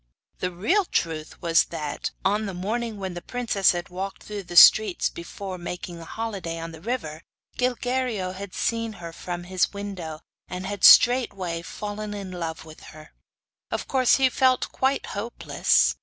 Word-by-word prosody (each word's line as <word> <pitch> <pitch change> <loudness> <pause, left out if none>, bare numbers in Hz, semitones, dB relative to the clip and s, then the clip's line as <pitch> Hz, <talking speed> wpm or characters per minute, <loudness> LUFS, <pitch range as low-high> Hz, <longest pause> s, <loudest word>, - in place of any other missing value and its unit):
The 180 - -1
real 320 - +1
truth 160 - -2
was 165 -1 +4
that, 150 -3 -4 0.2
on 210 +2 +1
the 195 - -5
morning 220 +4 -3
when 190 -2 -4
the 175 - -6
princess 220 -3 +1
had 175 0 -5
walked 190 +2 -6
through 210 -1 -6
the 175 - -8
streets 205 +1 +7
before 185 +2 -7
making 175 0 -6
holiday 195 -2 -5
on 165 0 -6
the 160 -1 -12
river 170 -8 -4 0.4
Gilguerillo 245 -5 -1
had 195 0 -8
seen 230 -1 -1
her 170 -4 -9
from 175 +1 -5
his 185 +2 0
window, 185 -6 -6 0.3
and 180 +1 -6
had 205 -1 -5
straightway 195 -9 +6
fallen 210 +3 -6
in 195 -2 -6
love 165 -3 -5
with 155 -1 -13 0.2
her. 155 0 -14 0.6
Of - - -3
course 260 -2 +4
he 265 -1 +4
felt 255 0 +2
quite 265 +1 0
hopeless. 145 - +1
190 Hz, 160 wpm, -25 LUFS, 170-220 Hz, 0.6 s, streets